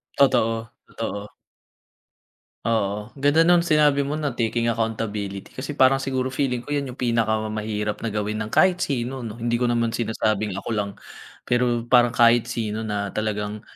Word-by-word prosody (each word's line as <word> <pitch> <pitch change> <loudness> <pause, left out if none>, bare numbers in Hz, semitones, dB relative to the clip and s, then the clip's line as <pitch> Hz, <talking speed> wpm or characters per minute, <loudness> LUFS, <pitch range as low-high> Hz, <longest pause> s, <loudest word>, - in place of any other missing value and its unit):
Totoo, 115 -4 +2 0.2
totoo. 100 +1 -6 1.3
Oo, 105 -1 -1
ganda 145 +4 +3
nung 175 0 +5
sinabi 150 -4 +3
mo 140 +2 -2
na 145 -4 -2
taking 115 0 0
accountability 105 -3 -3
kasi 140 +2 -6
parang 135 +1 +5
siguro 130 -1 -2
feeling 125 -3 -1
ko 145 - -3
'yan 140 -2 -1
yung 125 - -9
pinakamahirap 110 -3 -1
na 115 - -2
gawin 105 +1 -2
ng 110 - -4
kahit 180 - +3
sino 130 -1 -2
'no. 115 -1 -6
Hindi 120 0 -2
ko 125 - +2
naman 115 -1 +1
sinasabing 110 -3 -1
ako 100 - -6
lang, 105 -1 -1 0.6
pero 120 -1 +1
parang 120 0 +5
kahit 115 0 +4
sino 110 -2 -3
na 105 -2 -3
talagang 105 -1 -3
115 Hz, 155 wpm, -23 LUFS, 110-130 Hz, 1.3 s, nung